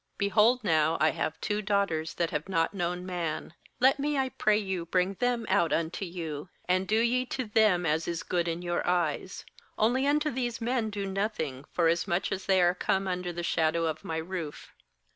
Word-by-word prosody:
8Behold 215 Hz, +5 st, +3 dB
now, 160 Hz, -3 st, +2 dB
I 155 Hz, -, +4 dB
have 155 Hz, -, -3 dB
two 210 Hz, 0 st, -1 dB
daughters 195 Hz, -6 st, 0 dB
that 170 Hz, -1 st, -1 dB
have 150 Hz, +5 st, -3 dB
not 165 Hz, -1 st, +1 dB
known 180 Hz, -1 st, -2 dB
man; 170 Hz, -4 st, -3 dB, 0.3 s
let 265 Hz, +2 st, +4 dB
me, 290 Hz, +1 st, 0 dB
I 265 Hz, -1 st, +1 dB
pray 215 Hz, -4 st, +2 dB
you, 190 Hz, -5 st, -3 dB
bring 180 Hz, +2 st, +1 dB
them 245 Hz, -2 st, 0 dB
out 170 Hz, -, +2 dB
unto 165 Hz, +4 st, -1 dB
you, 165 Hz, -3 st, -6 dB, 0.2 s
and 185 Hz, +1 st, +1 dB
do 220 Hz, +1 st, +2 dB
ye 240 Hz, +2 st, +2 dB
to 255 Hz, -1 st, -3 dB
them 210 Hz, -5 st, +3 dB
as 160 Hz, +1 st, 0 dB
is 170 Hz, -1 st, -3 dB
good 175 Hz, -1 st, -1 dB
in 170 Hz, +1 st, -3 dB
your 175 Hz, 0 st, -1 dB
eyes; 175 Hz, +1 st, -1 dB, 0.3 s
only 250 Hz, +5 st, +2 dB
unto 300 Hz, +1 st, +2 dB
these 240 Hz, -2 st, -2 dB
men 235 Hz, -1 st, 0 dB
do 205 Hz, -1 st, -4 dB
nothing; 190 Hz, -9 st, -3 dB
forasmuch 175 Hz, +2 st, +1 dB
as 190 Hz, -, -4 dB
they 190 Hz, -2 st, +4 dB
are 175 Hz, 0 st, +4 dB
come 190 Hz, +1 st, 0 dB
under 180 Hz, -1 st, -2 dB
the 175 Hz, 0 st, -5 dB
shadow 165 Hz, 0 st, +1 dB
of 160 Hz, -1 st, -3 dB
my 160 Hz, -, -3 dB
roof.' 165 Hz, -2 st, -6 dB
185 Hz, 195 wpm, -29 LUFS, 165-215 Hz, 0.3 s, I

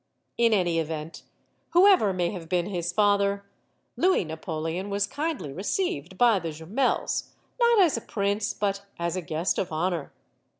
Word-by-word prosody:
In 235 Hz, -1 st, +3 dB
any 175 Hz, -5 st, +2 dB
event, 160 Hz, 0 st, -5 dB, 0.5 s
whoever 360 Hz, -, +6 dB
may 180 Hz, -2 st, 0 dB
have 170 Hz, -5 st, -8 dB
been 175 Hz, -1 st, +1 dB
his 175 Hz, -3 st, -2 dB
father, 200 Hz, 0 st, +2 dB, 0.5 s
Louis 370 Hz, -, +3 dB
Napoleon 160 Hz, +3 st, -4 dB
was 200 Hz, 0 st, +1 dB
kindly 285 Hz, -, -3 dB
received 185 Hz, -, -2 dB
by 230 Hz, -3 st, +5 dB
the 165 Hz, -2 st, -4 dB
Jumels; 165 Hz, -, -1 dB, 0.3 s
not 470 Hz, -2 st, +5 dB
as 340 Hz, -10 st, +4 dB
a -, -, -4 dB
prince, 205 Hz, +1 st, -1 dB
but 200 Hz, -1 st, -2 dB
as 170 Hz, 0 st, -2 dB
a 185 Hz, -, -2 dB
guest 160 Hz, +2 st, -1 dB
of 180 Hz, -, -2 dB
honor. 165 Hz, -1 st, -2 dB
190 Hz, 155 wpm, -26 LUFS, 165-215 Hz, 0.5 s, whoever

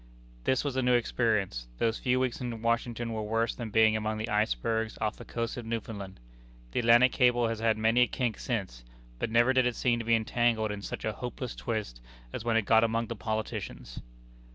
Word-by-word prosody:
This 130 Hz, -, +2 dB
was 140 Hz, -3 st, -2 dB
a 130 Hz, -, +1 dB
new 125 Hz, -1 st, +3 dB
experience. 105 Hz, -, 0 dB
Those 115 Hz, -, 0 dB
few 125 Hz, 0 st, +1 dB
weeks 130 Hz, -1 st, -1 dB
in 120 Hz, -2 st, -5 dB
Washington 115 Hz, 0 st, -1 dB
were 110 Hz, -, -2 dB
worse 115 Hz, +2 st, 0 dB
than 115 Hz, -3 st, -6 dB
being 110 Hz, +1 st, +4 dB
among 110 Hz, 0 st, -1 dB
the 110 Hz, -, -4 dB
icebergs 110 Hz, -, 0 dB
off 105 Hz, -1 st, -1 dB
the -, -, -9 dB
coast 115 Hz, +1 st, -4 dB
of 120 Hz, -, -6 dB
Newfoundland. 105 Hz, -4 st, -5 dB, 0.5 s
The -, -, 0 dB
Atlantic 120 Hz, +2 st, +6 dB
Cable 120 Hz, -2 st, +3 dB
has 115 Hz, -1 st, -3 dB
had 115 Hz, -1 st, +2 dB
many 110 Hz, +3 st, +3 dB
a 125 Hz, -, +5 dB
kink 120 Hz, -5 st, -2 dB
since, 95 Hz, -, -3 dB, 0.4 s
but -, -, -1 dB
never 120 Hz, +3 st, +4 dB
did 130 Hz, -1 st, +3 dB
it 120 Hz, -, -2 dB
seem 120 Hz, -2 st, +1 dB
to 115 Hz, -, -5 dB
be 115 Hz, 0 st, +4 dB
entangled 115 Hz, -1 st, +1 dB
in 105 Hz, -1 st, -5 dB
such -, -, -5 dB
a 110 Hz, -, 0 dB
hopeless 125 Hz, 0 st, -5 dB
twist 105 Hz, -, -4 dB, 0.3 s
as -, -, -4 dB
when 115 Hz, -1 st, +2 dB
it 110 Hz, -, +1 dB
got 110 Hz, +2 st, +5 dB
among 115 Hz, +1 st, 0 dB
the 115 Hz, -, -3 dB
politicians. 110 Hz, -, -4 dB
115 Hz, 210 wpm, -29 LUFS, 110-120 Hz, 0.5 s, Atlantic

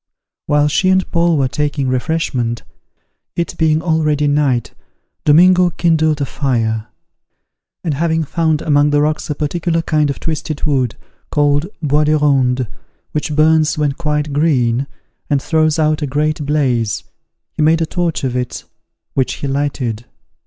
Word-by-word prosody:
While 150 Hz, 0 st, +3 dB
she 185 Hz, +5 st, +1 dB
and 185 Hz, 0 st, +3 dB
Paul 170 Hz, -1 st, +2 dB
were 135 Hz, -2 st, +2 dB
taking 145 Hz, 0 st, -2 dB
refreshment, 130 Hz, -3 st, -1 dB, 0.7 s
it 170 Hz, -, -2 dB
being 160 Hz, -1 st, +2 dB
already 155 Hz, -3 st, +1 dB
night, 145 Hz, -5 st, +1 dB, 0.5 s
Domingo 180 Hz, +4 st, +5 dB
kindled 160 Hz, -3 st, +1 dB
a -, -, +1 dB
fire: 115 Hz, -6 st, -1 dB, 1.0 s
and 165 Hz, -4 st, -1 dB
having 160 Hz, +2 st, 0 dB
found 160 Hz, 0 st, 0 dB
among 145 Hz, -1 st, +3 dB
the 145 Hz, 0 st, +2 dB
rocks 155 Hz, +1 st, -1 dB
a 150 Hz, -, -1 dB
particular 165 Hz, +3 st, -1 dB
kind 155 Hz, -3 st, +1 dB
of 140 Hz, -, -3 dB
twisted 155 Hz, -2 st, -4 dB
wood, 130 Hz, -6 st, 0 dB, 0.3 s
called 145 Hz, +1 st, +1 dB, 0.2 s
bois 150 Hz, +1 st, +2 dB
de 155 Hz, +1 st, +3 dB
ronde, 130 Hz, -4 st, +2 dB, 0.5 s
which 150 Hz, 0 st, -2 dB
burns 155 Hz, +1 st, +3 dB
when 150 Hz, -2 st, +1 dB
quite 150 Hz, -1 st, -2 dB
green, 135 Hz, -4 st, +1 dB, 0.4 s
and 145 Hz, -, +2 dB
throws 155 Hz, +1 st, +1 dB
out 155 Hz, 0 st, +1 dB
a 145 Hz, -, -1 dB
great 150 Hz, +1 st, -1 dB
blaze, 125 Hz, -8 st, 0 dB, 0.5 s
he -, -, -4 dB
made 160 Hz, +2 st, +4 dB
a 165 Hz, -, +1 dB
torch 170 Hz, -2 st, -2 dB
of 130 Hz, -2 st, -1 dB
it, 125 Hz, -1 st, -3 dB, 0.5 s
which 130 Hz, -2 st, 0 dB
he 140 Hz, -, -5 dB
lighted. 135 Hz, -5 st, -2 dB
150 Hz, 150 wpm, -17 LUFS, 140-160 Hz, 1.0 s, Domingo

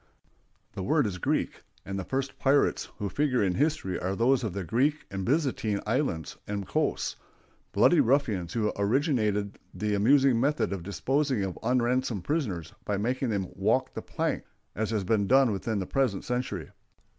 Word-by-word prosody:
The 100 Hz, -, -5 dB
word 145 Hz, +8 st, +2 dB
is 95 Hz, -3 st, -3 dB
Greek, -, -, -1 dB, 0.2 s
and 95 Hz, 0 st, -4 dB
the -, -, -3 dB
first 135 Hz, +6 st, -3 dB
pirates 140 Hz, +1 st, +2 dB
who 105 Hz, -, -2 dB
figure 130 Hz, 0 st, +1 dB
in 95 Hz, -2 st, +1 dB
history 145 Hz, -, 0 dB
are 95 Hz, +2 st, -2 dB
those 120 Hz, +4 st, +3 dB
of 105 Hz, -6 st, -2 dB
the 100 Hz, 0 st, -3 dB
Greek 135 Hz, -, +1 dB
and 95 Hz, 0 st, -3 dB
Byzantine 125 Hz, -, 0 dB
islands 105 Hz, -, -1 dB
and 100 Hz, -2 st, -3 dB
coasts—bloody -, -, 0 dB
ruffians 110 Hz, -, +1 dB
who 105 Hz, -2 st, 0 dB
originated 105 Hz, -, +1 dB, 0.2 s
the 105 Hz, 0 st, -1 dB
amusing 130 Hz, +4 st, +4 dB
method 145 Hz, -3 st, +1 dB
of 95 Hz, -, -4 dB
disposing 120 Hz, -, 0 dB
of 95 Hz, -2 st, -4 dB
unransomed 125 Hz, -3 st, +1 dB
prisoners 100 Hz, -, -2 dB
by 105 Hz, -, -1 dB
making 125 Hz, +5 st, -1 dB
them 100 Hz, -4 st, -1 dB
"walk -, -, +1 dB
the -, -, -5 dB
plank," -, -, -2 dB, 0.3 s
as 110 Hz, 0 st, -2 dB
has 110 Hz, -3 st, 0 dB
been 100 Hz, +1 st, +1 dB
done 135 Hz, -1 st, +5 dB
within 105 Hz, +2 st, -2 dB
the 95 Hz, -, -2 dB
present 125 Hz, -4 st, 0 dB
century. 125 Hz, 0 st, -3 dB
110 Hz, 165 wpm, -28 LUFS, 100-135 Hz, 0.3 s, done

